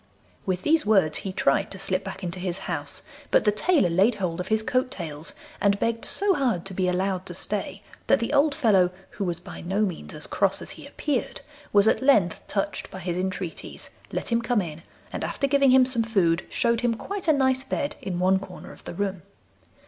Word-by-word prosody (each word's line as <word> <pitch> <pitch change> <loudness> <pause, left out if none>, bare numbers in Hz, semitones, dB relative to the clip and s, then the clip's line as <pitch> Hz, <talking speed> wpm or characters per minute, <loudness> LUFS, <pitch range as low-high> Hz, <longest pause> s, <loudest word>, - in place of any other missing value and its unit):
With 185 -1 -1
these 320 +1 +3
words 190 -8 +3
he 195 - -4
tried 140 -7 +2
to 195 - -7
slip 190 0 -1
back 190 0 -7
into 180 +1 -4
his 180 -1 -2
house, 145 -5 -4 0.3
but - - +3
the 210 - +5
tailor 240 - +2
laid 195 +8 +4
hold 180 -3 -2
of 180 - -3
his 220 +1 +1
coat 255 +2 +1
tails, 160 - -6 0.3
and 200 0 +3
begged 230 +1 -1
so 400 -1 +4
hard 245 - 0
to 195 - -6
be 185 0 0
allowed 185 0 -1
to 175 - -3
stay 200 +1 -2 0.2
that - - +5
the 230 - -2
old 285 0 +4
fellow, 205 - +4 0.2
who 205 - -4
was 175 -3 -2
by - - -9
no 190 +4 -1
means 190 -6 -2
as - - -5
cross - - +1
as - - -6
he - - -9
appeared, 285 -5 -2 0.3
was 205 +1 +5
at - - +3
length 215 -11 +3
touched 195 -1 -2
by - - -8
his 175 -1 -3
entreaties, 185 -1 -4 0.2
let - - -2
him 230 0 +3
come 235 -1 +1
in, 165 -4 -5 0.3
and - - -3
after 280 - -1
giving 275 0 +4
him 255 0 +7
some 250 -2 +1
food, 190 -6 +1
showed 235 -2 +1
him 240 -2 +1
quite 390 - -5
a - - +7
nice 260 -2 +2
bed 285 +1 -2
in 180 -2 -3
one 185 +1 +3
corner 190 -2 -10
of - - -15
the - - -6
room. 195 -1 -2
195 Hz, 215 wpm, -25 LUFS, 180-245 Hz, 0.3 s, him